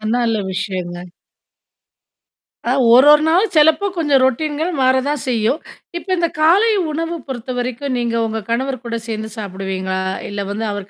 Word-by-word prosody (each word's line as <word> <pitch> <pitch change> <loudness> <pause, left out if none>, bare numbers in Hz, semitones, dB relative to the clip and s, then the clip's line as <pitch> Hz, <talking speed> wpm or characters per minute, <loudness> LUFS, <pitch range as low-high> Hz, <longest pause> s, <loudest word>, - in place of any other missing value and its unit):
நல்ல 230 -2 +1
விஷயம்ங்க. 180 -2 -4 1.9
ஒரு 265 +3 +7
ஒரு 300 +1 +4
நாளும் 375 +5 +2
சிலப்பம் 320 +6 +3
கொஞ்சம் 290 -5 +3
ரொடீன் 295 +4 -1 0.3
மாறத்தான் 260 +2 +1
செய்யும். 235 +5 +1 0.4
இப்போ 375 - -10
இந்தக் 340 -3 -1
காலை 395 +8 +5 0.2
உணவு 330 +2 -3
பொறுத்த 255 -1 -5
வரைக்கும் 255 +2 -3
நீங்க 235 -1 -1
உங்க 220 0 -3
கணவர் 260 +1 -1
கூடச் 230 0 -5
சேர்ந்து 220 -1 -4
சாப்பிடுவீங்களா? 190 -2 -4 0.3
இல்ல 200 0 -4
வந்து 220 +2 -3
அவர் 205 -1 -6
250 Hz, 140 wpm, -18 LUFS, 215-300 Hz, 1.9 s, ஒரு